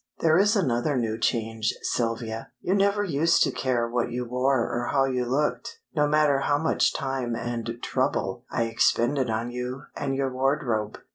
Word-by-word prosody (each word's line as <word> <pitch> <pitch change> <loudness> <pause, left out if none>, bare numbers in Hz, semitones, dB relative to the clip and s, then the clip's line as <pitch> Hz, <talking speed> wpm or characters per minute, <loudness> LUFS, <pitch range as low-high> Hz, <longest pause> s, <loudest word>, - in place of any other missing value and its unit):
"There 160 +1 +4
is 210 +3 +4
another 135 - +1
new 115 -2 -1
change, 115 -2 0
Sylvia. 115 -1 -2
You 185 - -1
never 200 +1 +2
used 165 -3 +3
to - - +1
care 120 -3 0
what 120 0 -1
you 125 +1 -3
wore 125 +1 +1
or 120 0 -2
how 135 -1 +3
you 125 -2 -1
looked, 145 +4 -1 0.2
no 150 -1 +3
matter 150 -2 +3
how 145 +1 +1
much 160 +2 +2
time 130 -3 -2
and 115 -1 -4
trouble - - -1
I 115 - 0
expended 120 +3 +1
on 115 +2 -2
you 125 +2 -5
and 135 -2 -2
your 135 -1 -1
wardrobe. 130 -5 0
125 Hz, 170 wpm, -26 LUFS, 115-145 Hz, 0.2 s, There